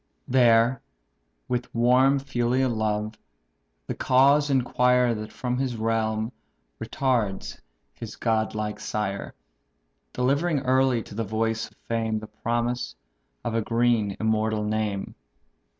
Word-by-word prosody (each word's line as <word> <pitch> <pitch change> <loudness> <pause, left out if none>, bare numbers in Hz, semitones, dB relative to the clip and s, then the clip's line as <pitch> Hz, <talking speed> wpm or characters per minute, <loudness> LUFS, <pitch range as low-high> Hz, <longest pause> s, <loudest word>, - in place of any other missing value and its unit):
There, 120 -1 +4 0.9
warm 125 +3 +4
with 140 -1 -1
filial 125 0 +1
love, 110 -1 -2 0.7
the - - -3
cause 140 +3 +4
inquire 125 -2 +3
That 110 -1 -6
from 125 0 -3
his 130 -3 -1
realm 110 0 -1 0.5
retards 115 -8 -1 0.3
his 115 -2 -8
god 110 -2 0
like 105 0 -3
sire; 100 -2 -3 0.8
Delivering 140 +4 +1
early 130 -2 +2
to - - -12
the 115 +2 -2
voice 110 +1 -1
of - - -28
fame 115 -1 -1
The 110 - -6
promise 120 +3 -2 0.5
of 115 - -2
a 115 - +1
green 115 -3 +1
immortal 110 -1 0
name." 105 -2 -2
115 Hz, 120 wpm, -25 LUFS, 110-125 Hz, 0.9 s, There